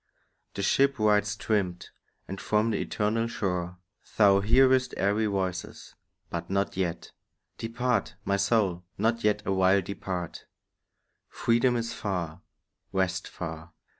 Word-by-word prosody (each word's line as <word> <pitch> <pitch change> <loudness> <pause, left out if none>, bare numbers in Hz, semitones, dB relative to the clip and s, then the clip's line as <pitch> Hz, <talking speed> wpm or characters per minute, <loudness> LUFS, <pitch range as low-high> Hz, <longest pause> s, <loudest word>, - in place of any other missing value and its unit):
The 100 - -2
ship 140 +7 +3
rides 105 -1 +2
trimmed, 100 -5 -2 0.4
and 95 0 -6
from 110 +2 +1
the 105 - -1
eternal 110 +2 0
shore 90 -5 -2 0.4
Thou 100 -2 +6
hearest 130 +5 +4
airy 105 +3 +1
voices; 95 -3 -3 0.4
but 85 0 -4
not 100 +1 0
yet 90 -3 -3 0.5
Depart, 115 -1 -1
my 100 - +1
soul, 100 -4 +1
not 115 +3 +1
yet 105 0 +2
awhile 95 0 +3
depart. 95 -2 -5 0.8
Freedom 120 +2 +2
is 115 0 -2
far, 90 -6 -3 0.5
rest 95 -1 0
far. 80 0 -7
100 Hz, 120 wpm, -28 LUFS, 95-115 Hz, 0.8 s, Thou